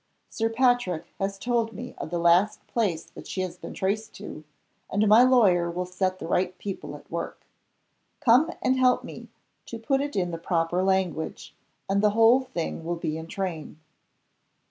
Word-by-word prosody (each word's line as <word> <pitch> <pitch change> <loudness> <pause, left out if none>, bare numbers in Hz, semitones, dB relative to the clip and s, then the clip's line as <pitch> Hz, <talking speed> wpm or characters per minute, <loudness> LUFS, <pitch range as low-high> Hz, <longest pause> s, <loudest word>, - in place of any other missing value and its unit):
Sir 225 0 0
Patrick 235 -8 +1
has 195 0 -2
told 230 +1 0
me 245 +5 -7
of - - -5
the 175 - -2
last 170 +5 +3
place 195 -9 -1
that - - -11
she 190 - -3
has 180 -2 -4
been - - -9
traced 215 +3 -2
to 155 - -9 0.5
and 210 +2 +2
my 215 +3 +7
lawyer 205 -9 +4
will 180 +2 -3
set 185 +1 -1
the - - -7
right 180 +2 0
people 195 -2 -6
at - - -15
work. - - -5 0.7
Come 255 +7 +5
and 260 0 +2
help 255 -1 +4
me - - -10 0.4
to 230 - -6
put 270 +4 0
it 285 0 -4
in 180 -3 0
the 165 - -5
proper 165 +1 0
language, 190 -4 -1 0.3
and 200 +1 +1
the 210 - +5
whole 230 +3 +6
thing 175 -10 -4
will 170 +1 -2
be 155 -2 -3
in 160 0 -6
train." 170 -5 -5
195 Hz, 180 wpm, -26 LUFS, 175-230 Hz, 0.7 s, my